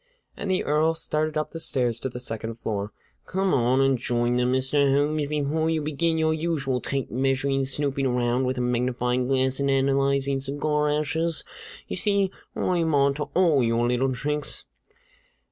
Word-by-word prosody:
And 200 - -5
the 185 -1 +1
Earl 155 +2 +2
started 155 -1 -1
up 155 - -2
the 165 - -6
stairs 120 -7 +1
to 130 - -3
the 125 - -7
second 115 -2 -4
floor. 105 -3 -4 0.4
"Come 190 0 0
on 125 +1 +3
up 135 - +4
and 135 -1 +2
join 120 0 0
them, 125 0 +1
Mr. 135 +2 +2
Holmes, 145 +1 +1
before 150 +2 0
you 160 -1 +1
begin 160 +2 0
your 160 0 +2
usual 150 -6 -1
tape 135 -3 -3
measuring, 135 +2 +1
snooping 135 0 -1
around 125 +1 +1
with 130 +1 -1
a - - 0
magnifying 125 0 0
glass, 130 0 +1
and 140 0 +1
analyzing 135 0 +2
cigar 150 +2 0
ashes! 155 +2 0 0.4
You - - -4
see, 200 -2 +1 0.2
I'm 165 -4 +1
on 140 0 +3
to 150 +1 -3
all 170 -6 +4
your 115 0 +1
little 125 +2 +1
tricks." 150 +3 -3
140 Hz, 175 wpm, -25 LUFS, 125-155 Hz, 0.4 s, up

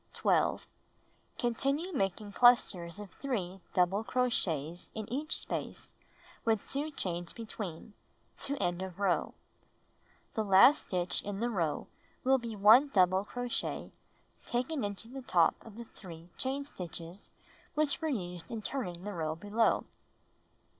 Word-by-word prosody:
12. - - +2 0.7
Continue 275 +9 0
making 205 - -1
clusters 200 -7 +4
of 205 -4 -8
3 195 -8 -3
double 190 +4 +3
crochets 180 - 0
in 215 -2 -4
each 300 +4 0
space - - -4 0.5
with 220 -2 +1
2 290 +3 -1
chains 175 - -3
between 210 -4 -6 0.2
— - - -34
to 280 - 0
end 175 -6 -1
of 190 -2 -6
row. 195 -3 +1 1.0
The 220 - 0
last 200 +8 +6
stitch 180 -1 0
in 200 -1 -4
the 240 +2 0
row 165 -8 -1 0.4
wiU 265 0 +4
be 230 -2 -5
1 220 +8 +7
double 185 -1 +4
crochet 245 +3 -3 0.5
taken 255 +4 -1
into 205 +2 -4
the 265 +3 -7
top 170 -9 +4
of 220 -3 -12
the 235 +1 -7
3 170 -5 -12
chain 270 +2 -2
stitches 175 - -8 0.5
which 300 0 +2
were 320 - 0
used 180 - -4
in 225 -2 -5
turning 180 -11 -3
the 205 +1 -4
row 160 -3 -2
below. 205 +6 +1
205 Hz, 140 wpm, -32 LUFS, 180-250 Hz, 1.0 s, 1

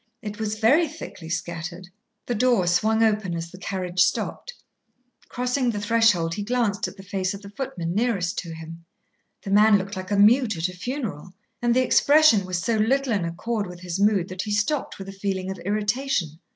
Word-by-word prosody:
It 210 -1 -6
was 215 0 -2
very 275 +10 +4
thickly 230 - -9
scattered. 170 +1 -5 0.4
The 245 - -2
door 240 -4 +2
swung 220 +6 +2
open 210 -5 +1
as 165 0 -5
the 185 - -12
carriage 185 -2 -4
stopped. - - 0 0.7
Crossing 250 +1 0
the 210 -3 -2
threshold, 205 -6 +2
he 205 - -4
glanced 225 -2 0
at - - -11
the 195 - -11
face 190 0 -2
of 200 - -11
the 200 - -10
footman 180 -9 -4
nearest 200 -5 0
to 170 - -7
him. 165 +1 -10 0.6
The 195 - -5
man 210 +1 +6
looked 195 +2 -5
like 185 0 -6
a 205 - +1
mute 220 0 +4
at 165 +3 -1
a - - -9
funeral, 195 - -5 0.3
and 240 0 +2
the 255 - +4
expression 285 -9 +5
was 185 -1 -1
so 220 +6 0
little 255 +4 +1
in 195 -5 0
accord 205 +6 -3
with 180 0 -10
his 180 0 -4
mood 200 -3 +3
that 185 0 -4
he 210 - -4
stopped 215 +8 -1
with 195 - -8
a - - -6
feeling 195 -1 -3
of 190 - -7
irritation. 205 - -1
205 Hz, 200 wpm, -24 LUFS, 180-230 Hz, 0.7 s, man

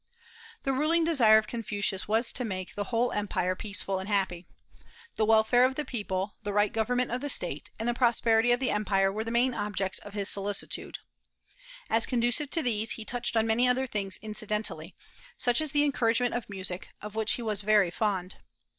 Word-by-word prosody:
The 270 - 0
ruling 310 +5 +2
desire 250 -10 +5
of 220 - +1
Confucius 210 -4 -2
was 225 +3 +1
to 250 - 0
make 185 -5 -5
the 205 - -3
whole 235 +3 0
empire 190 -3 -1
peaceful 200 -2 -3
and 190 +2 -6
happy. 190 -4 -1 0.7
The 215 - +1
welfare 225 +3 +5
of 260 +1 +2
the 300 - -3
people, 205 -5 -3
the 205 -1 -4
right 205 0 +2
government 245 +3 0
of 245 +1 -2
the 290 - -3
State, 170 - 0
and 225 - -2
the 240 - +2
prosperity 235 -1 +4
of 240 - +3
the 260 - 0
empire 195 -2 +1
were 215 +2 -3
the 230 - -5
main 245 +2 +2
objects 200 -3 -2
of 205 0 -11
his 200 -1 0
solicitude. 200 0 -2 0.9
As 225 +1 +1
conducive 245 +4 0
to 325 +1 0
these, 225 -3 0
he 220 - -8
touched 240 -1 -1
on 220 - +3
many 230 +3 +2
other 255 +1 +2
things 200 -6 -4
incidentally, 215 0 -2 0.4
such 245 +3 +2
as 310 -2 -2
the 290 -1 +3
encouragement 245 -4 +1
of 240 -3 -4
music, 185 -2 -5
of 210 0 -8
which 220 0 +2
he 240 - -3
was 210 -3 -1
very 205 -3 +3
fond. 190 -2 -2
220 Hz, 195 wpm, -28 LUFS, 205-245 Hz, 0.9 s, desire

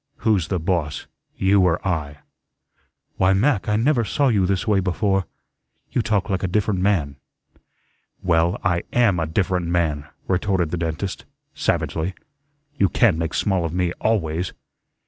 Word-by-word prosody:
Who's 100 -8 +2
the 95 - -1
boss, 80 -4 -1 0.3
you 95 +1 +3
or 90 -2 +2
I?" 75 -5 -3 1.0
"Why, 95 +1 +4
Mac, 105 +1 +1
I 105 - +2
never 120 +2 +2
saw 135 +6 +1
you 100 -6 +2
this 95 +1 0
way 105 -2 +3
before. 95 0 0 0.6
You - - +1
talk 110 -4 0
like 95 -2 -1
a 95 - 0
different 100 +1 0
man." 85 -8 +1 1.1
"Well, 85 -1 +2
I 85 -1 +1
AM 115 -8 +3
a 80 - -1
different 90 +1 0
man," 80 -4 0 0.2
retorted 95 -3 0
the 90 - -1
dentist, 85 +3 -3 0.3
savagely. 85 +4 -1 0.6
"You 100 - +4
can't 95 -7 +3
make 80 -1 -2
small 95 -4 +1
of 85 -1 -3
me 90 -1 0
ALWAYS." 90 -5 0
90 Hz, 150 wpm, -22 LUFS, 85-100 Hz, 1.1 s, Why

